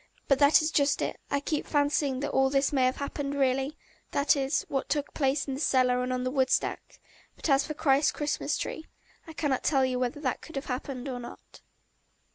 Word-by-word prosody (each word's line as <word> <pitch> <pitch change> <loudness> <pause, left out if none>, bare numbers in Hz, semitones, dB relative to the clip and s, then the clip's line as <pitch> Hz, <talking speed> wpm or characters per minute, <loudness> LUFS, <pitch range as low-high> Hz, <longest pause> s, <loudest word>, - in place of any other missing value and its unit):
But 275 -1 +3
that 285 +2 +6
is 310 - 0
just 285 -1 +2
it, - - -3
I 280 - +1
keep 295 +1 -3
fancying 285 -2 +1
that 290 - -2
all 265 0 +3
this 275 +1 +1
may 260 -2 +3
have 255 - +1
happened 280 0 -4
really 270 +2 0 0.3
that 280 +2 +2
is, 275 +1 0
what 270 -1 -2
took 295 -1 -1
place 275 0 0
in 270 - -2
the 265 - -5
cellar 250 -3 +2
and 250 0 -2
on 250 0 -1
the 255 - -1
woodstack; 265 -1 0 0.4
but - - -4
as 275 0 +3
for 305 - -5
Christ's 280 -1 +3
Christmas 295 -1 -2
tree, 320 - -5 0.4
I 320 - -9
cannot 290 -4 -1
tell 270 -3 +3
you 255 -1 -1
whether 250 +3 -2
that 260 -5 -2
could 320 - -12
have 275 - -3
happened 255 0 -4
or 255 -2 -4
not. 240 - -12
275 Hz, 215 wpm, -28 LUFS, 260-290 Hz, 0.4 s, that